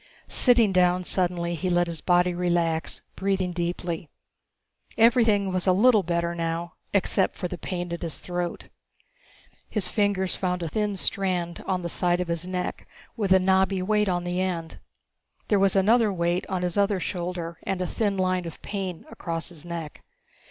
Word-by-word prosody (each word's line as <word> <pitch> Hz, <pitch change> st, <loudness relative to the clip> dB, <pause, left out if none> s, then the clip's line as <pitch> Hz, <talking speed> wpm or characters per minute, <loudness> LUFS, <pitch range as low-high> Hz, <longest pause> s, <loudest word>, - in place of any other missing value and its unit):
Sitting 240 Hz, -5 st, +4 dB
down 180 Hz, 0 st, +3 dB
suddenly, 175 Hz, -2 st, 0 dB
he 185 Hz, +2 st, -2 dB
let 175 Hz, 0 st, +3 dB
his 170 Hz, -2 st, -5 dB
body 180 Hz, 0 st, +3 dB
relax, 170 Hz, -2 st, 0 dB
breathing 190 Hz, -2 st, 0 dB
deeply. 170 Hz, -2 st, -3 dB, 0.9 s
Everything 225 Hz, -4 st, +4 dB
was 185 Hz, +1 st, 0 dB
a 185 Hz, -, +6 dB
little 220 Hz, +2 st, +5 dB
better 170 Hz, -1 st, -1 dB
now, 170 Hz, 0 st, -3 dB, 0.2 s
except 195 Hz, -1 st, +1 dB
for 180 Hz, -, -3 dB
the 180 Hz, -, -5 dB
pain 175 Hz, -1 st, -4 dB
at 170 Hz, -, -5 dB
his 165 Hz, -2 st, -3 dB
throat. 175 Hz, -1 st, -4 dB, 1.0 s
His 195 Hz, -5 st, -1 dB
fingers 200 Hz, -3 st, +1 dB
found 180 Hz, -2 st, -1 dB
a -, -, -2 dB
thin 205 Hz, +4 st, -1 dB
strand 180 Hz, -3 st, -1 dB
on 185 Hz, -2 st, 0 dB
the -, -, -1 dB
side 175 Hz, +1 st, +1 dB
of 180 Hz, -1 st, -2 dB
his 170 Hz, +1 st, -2 dB
neck 180 Hz, -1 st, -4 dB, 0.3 s
with 205 Hz, -5 st, -1 dB
a 190 Hz, -, +8 dB
knobby 190 Hz, 0 st, +2 dB
weight 210 Hz, +1 st, +2 dB
on 175 Hz, -1 st, 0 dB
the 175 Hz, +1 st, -1 dB
end. 170 Hz, -3 st, -3 dB, 0.7 s
There 205 Hz, -, +4 dB
was 195 Hz, 0 st, +3 dB
another 215 Hz, +3 st, +4 dB
weight 175 Hz, 0 st, 0 dB
on 185 Hz, -2 st, -1 dB
his 180 Hz, +2 st, 0 dB
other 200 Hz, -1 st, +2 dB
shoulder 175 Hz, -2 st, -4 dB
and 190 Hz, -, -2 dB
a 180 Hz, -, 0 dB
thin 200 Hz, +1 st, -1 dB
line 185 Hz, -1 st, +1 dB
of 165 Hz, -, -9 dB
pain 190 Hz, -5 st, -4 dB
across 165 Hz, 0 st, -4 dB
his 165 Hz, -4 st, -11 dB
neck. 170 Hz, -3 st, -6 dB
180 Hz, 175 wpm, -26 LUFS, 175-195 Hz, 1.0 s, a